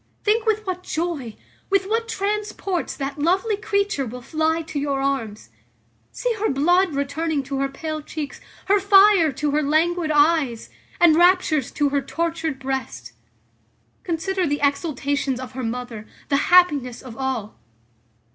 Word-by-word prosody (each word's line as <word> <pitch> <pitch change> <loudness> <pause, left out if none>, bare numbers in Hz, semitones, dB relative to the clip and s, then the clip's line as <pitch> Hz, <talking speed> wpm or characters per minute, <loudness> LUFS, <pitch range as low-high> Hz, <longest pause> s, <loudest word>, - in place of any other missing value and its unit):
Think 435 +2 +1
with 435 0 +1
what 365 -1 -3
joy, 315 -10 -3 0.3
with 395 -1 +2
what 455 +3 -1
transports 405 -3 -2
that 275 +1 -5
lovely 380 +8 +1
creature 400 -6 -1
will 250 +2 -8
fly 320 +3 0
to 315 -2 -4
your 280 -1 -1
arms. 230 - -3 0.6
See - - -1
her 435 - +1
blood 350 +4 +2
returning 285 +1 -1
to 270 0 -4
her 275 0 0
pale 310 +3 -5
cheeks, 300 -1 -7 0.2
her 400 +2 +3
fire 390 -4 +6
to 295 +2 -1
her 300 +1 +1
languid 320 +3 +1
eyes, 295 -5 +2 0.3
and 340 -3 +6
raptures 345 -5 +3
to 290 -1 +1
her 280 0 0
tortured 325 -2 -2
breast. 260 - -5 0.9
Consider 365 +1 -1
the 290 0 -1
exultations 280 -2 0
of 255 -1 -7
her 260 +1 -6
mother, 230 -2 -5 0.2
the 280 - +3
happiness 295 -9 +4
of 250 -4 -10
all. 260 -5 -4
310 Hz, 145 wpm, -22 LUFS, 270-360 Hz, 0.9 s, fire